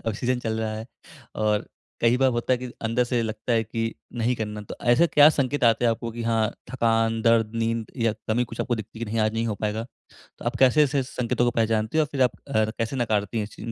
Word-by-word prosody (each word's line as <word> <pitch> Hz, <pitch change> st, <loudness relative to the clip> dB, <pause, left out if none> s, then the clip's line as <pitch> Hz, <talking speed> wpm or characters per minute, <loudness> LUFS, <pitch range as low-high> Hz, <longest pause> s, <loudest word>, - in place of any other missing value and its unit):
अ, 115 Hz, -, 0 dB
season 125 Hz, +4 st, -1 dB
चल 110 Hz, -2 st, -2 dB
रहा 110 Hz, -1 st, -2 dB
है 110 Hz, +1 st, -7 dB, 0.5 s
और 105 Hz, -1 st, 0 dB, 0.3 s
कई 115 Hz, +1 st, +4 dB
बार 135 Hz, +1 st, +3 dB
होता 120 Hz, +1 st, 0 dB
है 125 Hz, -, +2 dB
कि 125 Hz, 0 st, -6 dB
अंदर 115 Hz, +2 st, +1 dB
से 120 Hz, -1 st, 0 dB
लगता 110 Hz, +2 st, -3 dB
है 115 Hz, -1 st, +3 dB
कि 115 Hz, +1 st, -3 dB, 0.2 s
नहीं 120 Hz, +1 st, +1 dB
करना। 105 Hz, -1 st, -4 dB
तो 105 Hz, -, -8 dB, 0.2 s
ऐसे 160 Hz, +8 st, +5 dB
क्या 150 Hz, -2 st, +7 dB
संकेत 140 Hz, -2 st, 0 dB
आते 115 Hz, +1 st, +4 dB
हैं 120 Hz, -, +5 dB
आपको 115 Hz, +1 st, -5 dB
कि 115 Hz, +1 st, -5 dB
हाँ 115 Hz, -2 st, +1 dB, 0.2 s
थकान 115 Hz, -2 st, +1 dB
दर्द, 115 Hz, -2 st, +3 dB
नींद 115 Hz, 0 st, -1 dB
या 115 Hz, -3 st, +1 dB, 0.2 s
कमी 120 Hz, +3 st, +2 dB
कुछ 115 Hz, -1 st, -7 dB
आपको 120 Hz, -, 0 dB
दिखती 110 Hz, +1 st, -8 dB
है 115 Hz, -, -3 dB
कि 105 Hz, -, -8 dB
नहीं 115 Hz, +1 st, 0 dB
आज 110 Hz, -, 0 dB
नहीं 115 Hz, +1 st, 0 dB
हो 110 Hz, -, -1 dB
पाएगा। 110 Hz, +2 st, -1 dB, 0.5 s
तो -, -, -11 dB
आप 120 Hz, +1 st, -1 dB
कैसे 135 Hz, +3 st, +5 dB
ऐसे 140 Hz, -1 st, +1 dB
संकेतों 125 Hz, -1 st, -1 dB
को 120 Hz, -, +3 dB
पहचानती 110 Hz, +2 st, 0 dB
हो -, -, +5 dB
और -, -, -7 dB
फ़िर 135 Hz, -2 st, +1 dB
आप 125 Hz, -, +3 dB, 0.2 s
अ, 110 Hz, -6 st, +2 dB
कैसे 115 Hz, +3 st, -2 dB
नकारती 110 Hz, -3 st, 0 dB
हैं 105 Hz, -, 0 dB
इस 105 Hz, -, -13 dB
इन 110 Hz, -, -7 dB
115 Hz, 260 wpm, -25 LUFS, 110-125 Hz, 0.5 s, क्या